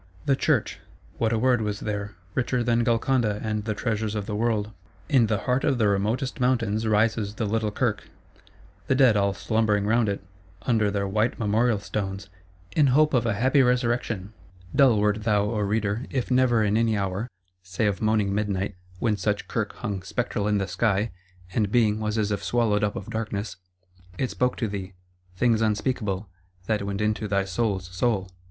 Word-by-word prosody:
The 135 - +3
Church: - - 0 0.4
what 110 -1 +1
a 115 - +1
word 125 0 +3
was 105 -1 -3
there; 105 -1 -4 0.2
richer 125 0 0
than 120 0 +2
Golconda 115 -2 +1
and 110 -1 -2
the 110 -1 -2
treasures 110 -1 -2
of 105 -2 -2
the 105 - -4
world! 110 -1 0 0.4
In 130 -6 +4
the 105 -2 0
heart 125 +1 0
of 135 - +2
the 110 -3 +3
remotest 110 +7 0
mountains 115 -4 +1
rises 110 -1 +1
the 110 - -2
little 110 +1 0
Kirk; 105 - -2 0.8
the 130 - +3
Dead 130 -5 +5
all 100 -1 +1
slumbering 110 -2 +1
round 110 0 +2
it, 100 -1 -3 0.4
under 110 -4 +2
their 100 -1 -1
white 105 +4 0
memorial 110 +1 +2
stones, 100 0 -4 0.5
"in 150 -3 +5
hope 150 +4 +4
of 120 -2 +2
a 110 - +1
happy 130 +6 +3
resurrection:"—dull 110 -3 0
wert 105 +1 +1
thou, 105 -2 +2
O 105 +1 -1
Reader, 105 +2 -1
if 130 -1 -2
never 125 -3 +4
in 105 +1 +2
any 115 -2 +2
hour 100 +4 -2 0.3
(say 95 +4 -2
of 100 -2 0
moaning 110 -2 +2
midnight, 100 -1 -1 0.2
when 110 +2 +1
such 105 +1 -1
Kirk - - -2
hung 100 -2 -4
spectral 105 +1 -2
in 105 -1 +2
the 95 -1 -1
sky, 100 +3 0 0.4
and 105 -2 0
Being 110 -3 +3
was 105 0 -2
as 105 -1 0
if 100 -1 -2
swallowed 105 0 +1
up 105 0 0
of 95 - -6
Darkness) 105 -1 -3 0.6
it 130 - -1
spoke 125 0 0
to 115 - -1
thee—things 95 +3 -3
unspeakable, 105 -2 -1 0.4
that 105 0 0
went 100 0 -2
into 105 0 0
thy 100 -1 +1
soul's 95 -1 -1
soul. 95 -3 0
105 Hz, 180 wpm, -25 LUFS, 100-115 Hz, 0.8 s, Dead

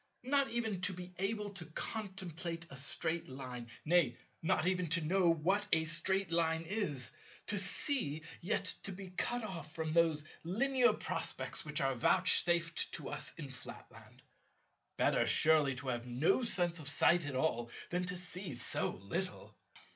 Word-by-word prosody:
Not 280 +1 +3
even 220 -5 -2
to 185 - +1
be 180 0 -9
able 205 +1 -1
to 195 -4 -4
contemplate 175 -3 -4
a - - -8
Straight 160 +5 -1
Line! 125 -3 -7 0.2
Nay, 160 -6 +3 0.2
not 165 -1 +1
even 180 -1 +1
to 165 +2 +4
know 175 +3 +3
what 190 +6 +1
a 160 0 +3
Straight 175 +3 0
Line 165 -1 +1
is! 160 - -2 0.3
To 205 - +2
see, 195 - 0 0.2
yet 185 +5 0 0.2
to 195 - -2
be 190 0 -8
cut 240 +6 -1
off 170 -6 -7
from 160 -1 -2
those 165 -3 +3 0.2
Linear 245 +8 +3
prospects - - -2
which 150 -1 0
are 135 0 +2
vouchsafed 170 +5 +3
to - - -4
us - - -4
in 145 -5 -7
Flatland! 130 - -11 0.7
Better - - +3
surely 150 -4 +5
to 130 +1 -5
have 120 0 -3
no 130 - +2
sense 175 -7 +2
of 145 -2 -2
sight 165 +2 +4
at 140 - -4
all 120 -4 0 0.2
than 180 +1 0
to 180 0 -2
see 180 -3 -4
so - - -1
little! 100 - -4
170 Hz, 160 wpm, -35 LUFS, 150-190 Hz, 0.7 s, surely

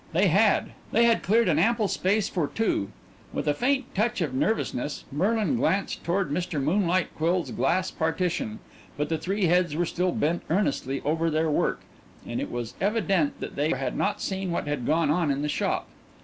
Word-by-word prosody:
They 185 +3 +4
had; 200 +5 +3 0.2
they 230 - +4
had 235 -1 +4
cleared 225 +3 +3
an 160 -3 +3
ample 225 +3 +2
space 195 +2 +1
for 165 -5 -1
two. 210 - -1 0.4
With - - -3
a 145 - +4
faint 265 - 0
touch 220 +3 0
of 155 -6 -1
nervousness 145 - -1
Merlin 215 - +1
glanced 195 -3 0
toward 175 -2 0
Mr. 175 -1 -1
Moonlight 180 +4 +1
Quill's 170 +2 0
glass 170 +9 0
partition, 160 - -1 0.4
but 150 - -1
the 160 -1 0
three 195 +1 0
heads 175 -2 +2
were 175 +2 +1
still 180 +2 0
bent 165 +2 0
earnestly 155 -7 0
over 165 +3 +1
their 160 0 +1
work, - - 0 0.4
and - - -3
it - - -4
was 120 -2 -4
evident 195 -7 +1
that - - -6
they 145 +2 +1
had 135 -3 -1
not 205 - 0
seen 190 -1 -2
what 170 - -1
had 145 -5 -2
gone 160 -1 +2
on 165 -1 +1
in 140 +1 0
the - - 0
shop. - - -1
175 Hz, 190 wpm, -26 LUFS, 150-200 Hz, 0.4 s, They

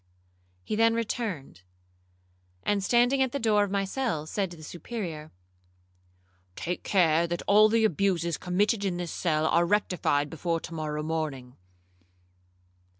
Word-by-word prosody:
He 210 - -3
then 225 +1 +3
returned, 215 - -4 1.0
and 205 -1 0
standing 245 +5 +3
at 260 -2 +1
the - - 0
door 215 -5 +3
of 205 - -2
my 195 0 0
cell, 195 - -2
said 195 +4 -2
to 175 - -11
the 155 - -12
Superior, 165 -2 -6 1.2
'Take 175 +1 -4
care 170 -3 +3
that 170 0 -3
all 210 +1 +6
the 225 0 +3
abuses 175 -3 +1
committed 200 +4 0
in 185 -3 -1
this 175 -2 -4
cell 155 -3 0
are 170 +2 +3
rectified 170 -6 +1
before 165 +1 -1
to 165 - -8
morrow 150 -1 -3
morning.' 150 -6 -4
180 Hz, 145 wpm, -27 LUFS, 160-210 Hz, 1.2 s, all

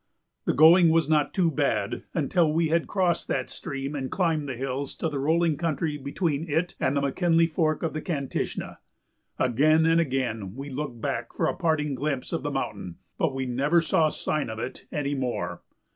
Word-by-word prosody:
The - - +1
going 165 +4 +7
was 160 -2 +3
not 150 -2 +2
too 175 -4 +2
bad 140 - -1
until 165 -4 +2
we 160 0 +1
had 165 +1 +1
crossed 180 -4 0
that - - -2
stream 135 +1 -5
and 135 -3 -3
climbed 160 -6 0
the 130 - -3
hills 135 +2 -3
to 165 - -2
the 145 -2 -3
rolling 160 +2 +2
country 160 -2 -1
between 150 +2 -2
it 165 +4 0
and 135 +2 +1
the - - +2
McKinley 165 +4 +2
Fork 155 -1 0
of 165 - -1
the 155 - -3
Kantishna. 140 -6 -3 0.6
Again 155 +6 +3
and 165 +1 +4
again 120 - -2
we 140 +2 -7
looked 130 -3 -5
back - - -3
for - - 0
a - - 0
parting 155 -5 0
glimpse 135 0 -3
of - - -1
the - - -2
mountain, 90 -2 -4 0.2
but 135 - +1
we 135 0 -2
never 140 +7 +2
saw 160 -1 +2
sign 150 -3 -2
of 110 - -5
it 125 - -6
any 145 -1 -1
more. 130 -3 -3
150 Hz, 190 wpm, -26 LUFS, 135-165 Hz, 0.6 s, going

